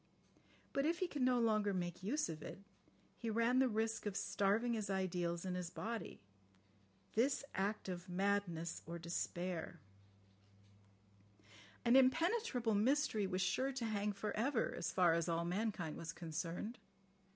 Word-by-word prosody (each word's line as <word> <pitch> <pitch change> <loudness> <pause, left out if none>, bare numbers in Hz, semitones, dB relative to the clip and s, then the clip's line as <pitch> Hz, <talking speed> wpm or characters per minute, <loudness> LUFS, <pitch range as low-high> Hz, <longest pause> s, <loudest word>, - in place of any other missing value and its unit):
But 275 +2 +2
if 335 +1 +1
he 370 - 0
could 295 -5 -4
no 250 0 +4
longer 215 -3 +2
make 175 -1 -3
use 265 +11 0
of 160 -2 -6
it, 195 - -8 0.6
he 230 - -2
ran 230 +3 +3
the 265 -1 +4
risk 220 0 -1
of 200 -1 -2
starving 210 +4 +1
his 215 -3 -2
ideals 175 -2 -1
and 185 -1 -1
his 180 -2 -3
body... 225 +4 -4 0.9
"This 265 +6 +2
act 200 +2 -1
of 180 0 -5
madness 180 -3 0
or 170 +1 -4
despair." 170 0 -3 2.1
"An 235 +1 +6
impenetrable 265 - +3
mystery" 220 -1 +2
was 185 0 -1
sure 265 +6 +1
"to 250 -3 -2
hang 210 -1 0
for 205 +1 -3
ever" 235 +2 +1
as - - -2
far 175 -3 +5
as 170 +1 +1
all 170 0 +1
mankind 180 -3 -1
was 165 0 -5
concerned. 170 +7 -4
205 Hz, 150 wpm, -38 LUFS, 175-235 Hz, 2.1 s, An